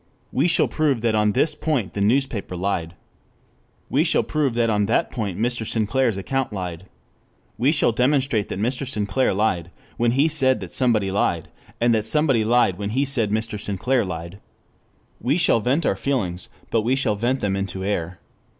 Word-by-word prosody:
We 140 +6 +2
shall 170 - +3
prove 145 -7 0
that 115 -1 +1
on 105 -1 +2
this 155 +7 +2
point 150 - -2
the 100 - -3
newspaper 115 -3 0
lied. 90 -2 -2 0.9
We - - +2
shall - - +2
prove 145 -6 -1
that 120 -1 +2
on 105 -2 +1
that 115 - +1
point 105 -7 -3
Mr. 120 +1 0
Sinclair's 115 +1 0
account 135 +7 -2
lied. 90 -2 -6 0.7
We 135 +5 +2
shall 150 -6 +2
demonstrate 125 -3 +1
that - - -4
Mr. 125 +5 -1
Sinclair 115 +1 +1
lied 95 -4 0 0.3
when 120 0 +2
he 140 +4 +3
said 130 -6 +2
that 95 - -7
somebody 110 -7 +1
lied, 85 -4 0 0.3
and 120 0 +3
that 110 -2 0
somebody 135 -3 +3
lied 110 -5 +2
when 100 0 -3
he 135 +6 0
said 125 -6 +1
Mr. 110 0 -2
Sinclair 105 +6 0
lied. 85 +1 -6 0.8
We 140 +6 +1
shall 165 - +3
vent 135 +8 0
our - - +2
feelings, 95 -7 -2 0.2
but 115 - +2
we 120 +4 +1
shall 130 -6 0
vent 120 +5 -1
them 100 -2 0
into 95 -1 -4
air. 90 -3 -2
115 Hz, 180 wpm, -22 LUFS, 100-130 Hz, 0.9 s, shall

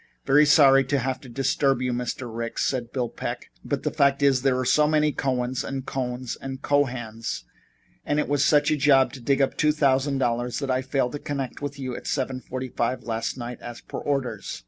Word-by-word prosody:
"Very 145 +2 +5
sorry 135 -2 +6
to 140 +2 0
have 130 0 -2
to 130 - -12
disturb 135 +1 +1
you, 125 -1 -1
Mr. 125 +1 -3
Ricks," 115 0 -3
said 125 -3 -2
Bill 125 -3 -1
Peck, - - -6
"but - - -3
the - - 0
fact 140 -2 +2
is 135 -2 +4
there 135 -1 +2
were 130 0 -1
so 150 +4 +4
many 150 0 +2
Cohens 130 -2 -1
and 135 -1 -5
Cohns 125 -2 -3
and 135 -1 -7
Cohans, 120 - -1 0.6
and 145 - -1
it - - 0
was 145 -1 +2
such 145 0 +4
a - - +3
job 135 -2 +4
to 135 - -8
dig 140 +3 +2
up 135 - -1
two 150 - +3
thousand 140 -2 +2
dollars, 120 -2 -1
that 140 -2 -2
I 130 0 +1
failed 130 -1 -1
to 145 - -5
connect 140 -3 -4
with 145 0 -4
you 130 -3 -4
at - - -8
seven 130 -2 -1
forty 130 0 -5
five 120 +2 -2
last 115 +1 -3
night, 120 0 -6
as 120 0 -8
per - - -7
orders. 130 -7 -3
130 Hz, 215 wpm, -25 LUFS, 125-140 Hz, 0.6 s, sorry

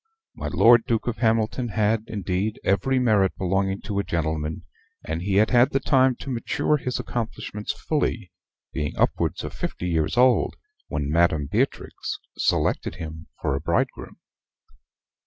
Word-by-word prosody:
My - - -5
Lord 115 0 +5
Duke 115 -2 0
of 120 -2 -2
Hamilton 115 +1 +1
had, 110 0 +1
indeed, 100 +1 -2
every 130 +7 +2
merit 110 -6 +2
belonging 95 +1 0
to 100 0 -3
a - - 0
gentleman, 80 -1 -2 0.4
and 80 +2 -3
he 95 +1 -1
had 105 +2 +4
had 120 0 +5
the 135 - +1
time 130 -3 +3
to 135 - -5
mature 125 +5 0
his 125 -2 -3
accomplishments 110 -3 -4
fully, 115 - -2 0.4
being 75 - -3
upwards - - 0
of - - -6
fifty 90 - -4
years 80 +4 0
old 125 0 +4 0.3
when 70 -1 -2
Madam 80 -3 +3
Beatrix - - -2 0.2
selected - - 0
him 80 -1 -8 0.2
for - - +1
a 70 - -2
bridegroom. 85 +2 -1
105 Hz, 150 wpm, -24 LUFS, 85-120 Hz, 0.4 s, Lord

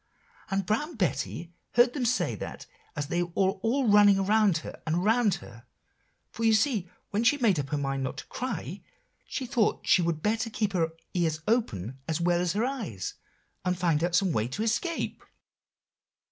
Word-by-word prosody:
"And 195 -1 0
Brown 295 - -1
Betty 170 - -2 0.2
heard 240 0 +5
them 265 -4 -1
say 250 +2 +1
that - - -7 0.3
as 145 -2 -2
they 175 +4 -1
were 175 - -2
all 225 +7 +1
running 205 -1 +7
around 195 -4 +3 0.2
and 160 - +1
around 210 +2 +3
her; 120 -8 -12 0.6
for 230 - -5
you 225 -1 +5
see 215 -6 +1 0.2
when 210 +3 +1
she 285 +5 +4
made 215 - +3
up 140 -1 -3
her 150 - -1
mind 135 -1 -1
not 130 +1 -3
to - - -7
cry, 255 +1 -5 0.5
she 265 - -3
thought 235 -3 +1
she 185 - +5
would 165 -2 -1
better 225 +2 0
keep 210 -2 -1
her 165 -3 +1 0.2
ears 160 -3 0
open 135 - 0
as 160 0 -1
well 175 0 +2
as 180 -2 0
her 215 +4 +1
eyes, 205 - -4 0.5
and 180 0 0
find 165 -3 +1
out 175 0 +1
some 190 -1 +3
way 110 -5 0
to 140 - -3
escape." 280 +10 -1
195 Hz, 180 wpm, -28 LUFS, 160-225 Hz, 0.6 s, running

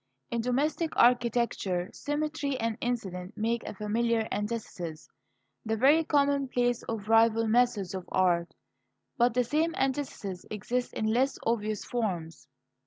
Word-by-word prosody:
In 235 -1 0
domestic 290 +7 0
architecture 235 -7 +2
Symmetry 290 -1 -2
and 230 -2 -1
Incident 190 -7 -3
make 230 +2 0
a - - -6
familiar 225 +2 0
antithesis 205 -7 -4 0.6
the 220 0 -1
very 290 +7 +5
commonplace 275 -5 +1
of 215 -3 -4
rival 225 0 +4
methods 220 -5 +2
of 185 -2 -6
art. 175 -2 +1 0.6
But 240 0 +3
the 250 - +3
same 315 +6 0
antithesis 260 -9 -2
exists 245 +4 -2
in 215 - -2
less 250 +5 +2
obvious 215 -2 -1
forms. 180 - -3
230 Hz, 125 wpm, -29 LUFS, 210-250 Hz, 0.6 s, very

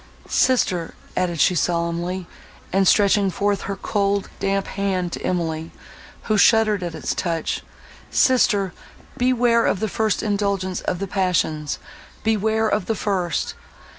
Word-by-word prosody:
Sister!" 185 -10 +1 0.2
added 175 -3 -1
she 180 - +4
solemnly, 175 +1 -1 0.5
and 195 0 +3
stretching 200 0 +4
forth 200 +2 0
her 200 - -1
cold, 200 0 -1
damp 195 0 0
hand 190 -3 -2
to - - -5
Emily, 165 -2 -2 0.5
who 215 -2 +1
shuddered 215 -3 +4
at 170 -2 -4
its 160 - -2
touch—"Sister! 195 - 0 0.4
beware 245 -2 +3
of 190 - +1
the 220 - 0
first 215 0 0
indulgence 200 -3 -1
of 180 - -2
the 195 +2 -4
passions; 170 -6 0 0.5
beware 220 0 +1
of 210 0 0
the 225 - 0
first! 185 -5 -1
195 Hz, 130 wpm, -22 LUFS, 175-210 Hz, 0.5 s, she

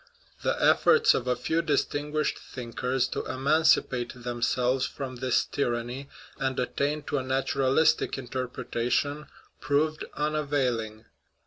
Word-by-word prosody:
The - - 0
efforts 460 -1 +5
of 125 - -2
a 125 - +2
few 160 +7 0
distinguished 150 0 -1
thinkers 125 +1 -2
to - - -3
emancipate 130 -3 +2
themselves 125 +1 0
from 130 -3 -6
this 130 0 +1
tyranny 125 +1 -3 0.3
and 130 -1 -1
attain 145 +4 -1
to 145 - -1
a - - -4
natural 130 0 0
istic 160 -2 +3
interpretation 130 +2 -2 0.3
proved 150 +2 0
unavailing. 135 -8 -1
130 Hz, 115 wpm, -27 LUFS, 125-145 Hz, 0.3 s, efforts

